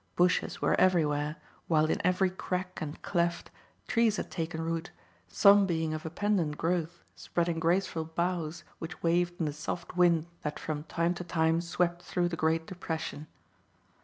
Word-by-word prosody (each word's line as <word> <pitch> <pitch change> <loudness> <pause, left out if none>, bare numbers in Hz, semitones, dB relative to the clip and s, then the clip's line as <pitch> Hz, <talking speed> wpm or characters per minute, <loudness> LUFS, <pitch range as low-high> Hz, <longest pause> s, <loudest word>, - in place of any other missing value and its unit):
Bushes 180 0 +2
were - - +3
everywhere, 150 -4 +2 0.3
while 155 -2 +4
in - - 0
every 180 +1 +2
crack 185 0 -4
and 155 -1 -5
cleft, 170 -2 0 0.4
trees 230 -3 +3
had - - -4
taken 165 -1 -3
root, 165 +1 -2 0.4
some 200 - +6
being 160 -3 0
of 155 +1 -4
a - - -3
pendent 175 -4 0
growth 170 0 -1
spreading 170 -1 -1
graceful 170 -1 +1
boughs 170 0 -2 0.2
which 165 +2 -7
waved 175 +1 +1
in 165 - +1
the 150 - -2
soft 165 +4 -5
wind 170 -3 +4 0.2
that 150 - -3
from 150 -1 -4
time 170 +1 0
to 180 - -6
time 165 -1 +1
swept 175 0 0
through 175 -1 0
the 170 - -3
great 160 0 +1
depression. 160 -4 -5
170 Hz, 160 wpm, -30 LUFS, 160-180 Hz, 0.4 s, some